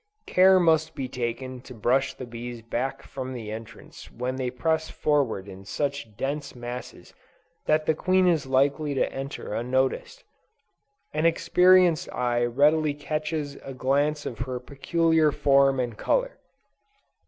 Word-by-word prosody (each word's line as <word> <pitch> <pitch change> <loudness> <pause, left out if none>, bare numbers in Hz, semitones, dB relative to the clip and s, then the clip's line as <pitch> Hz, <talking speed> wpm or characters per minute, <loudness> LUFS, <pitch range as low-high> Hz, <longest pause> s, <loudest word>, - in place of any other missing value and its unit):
Care 185 +1 +5
must 160 -2 +2
be 135 - -3
taken 125 +1 -4
to 125 0 -12
brush 130 +5 +1
the 130 - -7
bees 120 0 -8
back 120 +4 -3
from 130 -1 -6
the 110 -4 -6
entrance 110 +1 -10
when 125 +2 -4
they 130 -1 -1
press 160 +5 -1
forward 135 -10 0
in 95 0 -10
such 135 -1 -4
dense 140 +2 -3
masses 120 0 -8 0.5
that 155 0 +2
the 160 - +3
queen 185 +4 +2
is 160 -6 +2
likely 140 +2 +1
to - - 0
enter 135 -5 -6
unnoticed. 130 - -1 0.9
An 155 +2 +2
experienced 180 0 +4
eye 120 -1 0
readily 145 +5 +3
catches 150 0 -3
a 135 - -9
glance 145 +3 0
of 115 - -5
her 125 0 -3
peculiar 160 +4 +1
form 135 -1 +3
and 120 -3 -2
color. - - -1
135 Hz, 140 wpm, -26 LUFS, 125-155 Hz, 0.9 s, Care